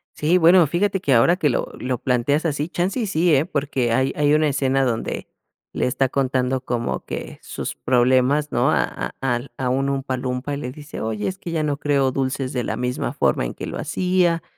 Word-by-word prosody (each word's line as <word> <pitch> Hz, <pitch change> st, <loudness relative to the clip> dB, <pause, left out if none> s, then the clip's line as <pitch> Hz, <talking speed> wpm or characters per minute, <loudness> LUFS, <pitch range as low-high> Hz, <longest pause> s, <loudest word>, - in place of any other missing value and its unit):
Sí, 160 Hz, +4 st, +2 dB
bueno, 175 Hz, 0 st, +6 dB
fíjate 195 Hz, +5 st, 0 dB
que 145 Hz, -7 st, +1 dB
ahora 145 Hz, +9 st, +5 dB
que 155 Hz, -5 st, +2 dB
lo 120 Hz, -, -1 dB
lo 125 Hz, 0 st, -2 dB
planteas 130 Hz, +6 st, 0 dB
así, 150 Hz, -1 st, -1 dB
chance, 180 Hz, +6 st, -1 dB
y 225 Hz, -, -1 dB
sí, 175 Hz, -3 st, +2 dB
¿eh? 140 Hz, +3 st, +2 dB
Porque 140 Hz, -7 st, -1 dB
hay 130 Hz, +3 st, +2 dB
hay 145 Hz, 0 st, +3 dB
una 155 Hz, 0 st, +3 dB
escena 135 Hz, -1 st, +1 dB
donde 120 Hz, -3 st, -2 dB, 0.4 s
le -, -, -1 dB
está 130 Hz, +1 st, +1 dB
contando 130 Hz, -1 st, 0 dB
como 120 Hz, -2 st, -3 dB
que -, -, -6 dB
sus -, -, -5 dB
problemas, 130 Hz, +4 st, +2 dB
¿no? 120 Hz, 0 st, +2 dB
A -, -, +3 dB
a -, -, -6 dB
al 125 Hz, 0 st, -1 dB
a 130 Hz, -1 st, -1 dB
un 135 Hz, +2 st, +1 dB
Oompa 135 Hz, -1 st, -2 dB
Loompa, 125 Hz, +2 st, -3 dB
y -, -, -4 dB
le 125 Hz, -3 st, -5 dB
dice: 145 Hz, +2 st, -9 dB
"Oye, 110 Hz, -1 st, -2 dB
es 190 Hz, -, -3 dB
que 175 Hz, -, -7 dB
ya 160 Hz, -2 st, 0 dB
no 145 Hz, -2 st, -1 dB
creo 140 Hz, -2 st, +1 dB
dulces 130 Hz, 0 st, -2 dB
de 125 Hz, -2 st, -1 dB
la 110 Hz, -, -2 dB
misma 125 Hz, +1 st, -2 dB
forma -, -, +1 dB
en -, -, -4 dB
que -, -, -7 dB
lo -, -, -5 dB
hacía, 180 Hz, -2 st, +1 dB
135 Hz, 220 wpm, -22 LUFS, 125-155 Hz, 0.4 s, bueno